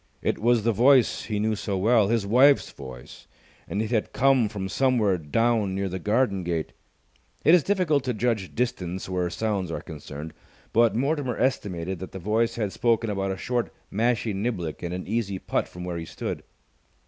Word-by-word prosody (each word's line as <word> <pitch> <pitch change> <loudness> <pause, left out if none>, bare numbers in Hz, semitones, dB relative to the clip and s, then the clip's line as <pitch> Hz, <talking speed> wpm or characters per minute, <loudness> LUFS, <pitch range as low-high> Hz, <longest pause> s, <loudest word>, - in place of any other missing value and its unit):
It - - 0
was 120 0 +3
the 115 - +3
voice 125 +3 +4
he 105 -2 -2
knew 110 +1 +1
so 100 -1 -3
well, 110 +1 +4
his 115 -1 +1
wife's 130 +7 +5
voice, 65 -3 -11 0.4
and 105 +3 -1
it 110 - -5
had 110 -3 0
come 130 -4 +3
from 95 -2 -4
somewhere 110 -5 +2
down 105 +5 +1
near 100 0 -1
the 95 0 -4
garden 105 0 +1
gate. 85 -2 -2 0.7
It 160 - +7
is 180 - +7
difficult 170 -7 +1
to 125 - 0
judge 110 -4 -1
distance 95 -7 -2
where 90 -1 -1
sounds 100 -1 -2
are 85 - -4
concerned, 75 0 -8 0.4
but 115 -2 +4
Mortimer 135 0 0
estimated 95 -8 -1
that 95 - -8
the - - -5
voice 110 +5 0
had 105 -4 -2
spoken 115 -2 +1
about 95 -1 -1
a 95 - -2
short 120 +6 -2 0.2
mashie 115 0 +1
niblick 95 -6 -3
and 85 - -4
an 90 +1 -4
easy 105 -2 -1
putt - - -1
from 90 - -9
where 90 -1 -4
he 85 - -5
stood. - - -5
105 Hz, 185 wpm, -26 LUFS, 95-120 Hz, 0.7 s, It